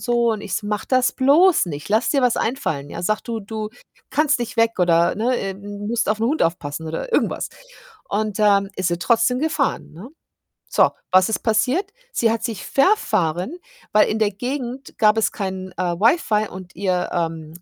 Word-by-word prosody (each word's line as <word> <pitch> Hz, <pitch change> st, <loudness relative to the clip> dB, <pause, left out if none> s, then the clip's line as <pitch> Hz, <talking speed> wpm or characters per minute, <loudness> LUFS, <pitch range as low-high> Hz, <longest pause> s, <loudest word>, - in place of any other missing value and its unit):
so.“ 240 Hz, -1 st, +2 dB
Und 215 Hz, -, -4 dB
ich 200 Hz, -, -4 dB
so: 210 Hz, -, -3 dB
„Mach 210 Hz, -1 st, -2 dB
das 255 Hz, -1 st, +3 dB
bloß 300 Hz, -, +4 dB
nicht. 150 Hz, -2 st, -6 dB
Lass 220 Hz, +3 st, +2 dB
dir 275 Hz, -2 st, +2 dB
was 245 Hz, -2 st, +3 dB
einfallen, 150 Hz, -, -2 dB
ja? 170 Hz, -, -6 dB
Sage, 215 Hz, +4 st, 0 dB
du 230 Hz, -2 st, -4 dB
du 215 Hz, +1 st, -5 dB, 0.4 s
kannst 295 Hz, -1 st, +2 dB
nicht 235 Hz, -1 st, -4 dB
weg 230 Hz, 0 st, +3 dB
oder, 170 Hz, -1 st, +3 dB
ne, 245 Hz, +4 st, +1 dB
äh, 195 Hz, -4 st, -3 dB
musst 205 Hz, +3 st, -3 dB
auf 215 Hz, 0 st, 0 dB
'n 225 Hz, -, +2 dB
Hund 300 Hz, +6 st, +1 dB
aufpassen 160 Hz, -2 st, -3 dB
oder 165 Hz, -, -5 dB
irgendwas.“ -, -, 0 dB, 0.6 s
Und, 215 Hz, 0 st, -2 dB
ähm, 200 Hz, -1 st, +3 dB
ist 185 Hz, -, -1 dB
sie 175 Hz, 0 st, -1 dB
trotzdem 230 Hz, +6 st, +2 dB
gefahren, 310 Hz, -3 st, -1 dB
ne? 180 Hz, +11 st, -10 dB, 0.6 s
So, -, -, +4 dB, 0.2 s
was 185 Hz, +1 st, +5 dB
ist 220 Hz, -, -1 dB
passiert? 245 Hz, -, +1 dB, 0.2 s
Sie 230 Hz, -, +2 dB
hat 230 Hz, 0 st, -3 dB
sich 225 Hz, -5 st, -4 dB
verfahren, 215 Hz, -, +1 dB, 0.4 s
weil 210 Hz, -, +5 dB
in 215 Hz, -, -1 dB
der 210 Hz, -1 st, +2 dB
Gegend 250 Hz, +4 st, -5 dB
gab 215 Hz, -1 st, +4 dB
es 220 Hz, -, +2 dB
kein, 190 Hz, -1 st, -5 dB
äh, -, -, 0 dB
Wi-Fi 215 Hz, -, +2 dB
und 185 Hz, -1 st, -10 dB
ihr, 185 Hz, -1 st, 0 dB
ähm, 165 Hz, -2 st, -3 dB
215 Hz, 190 wpm, -21 LUFS, 185-240 Hz, 0.6 s, was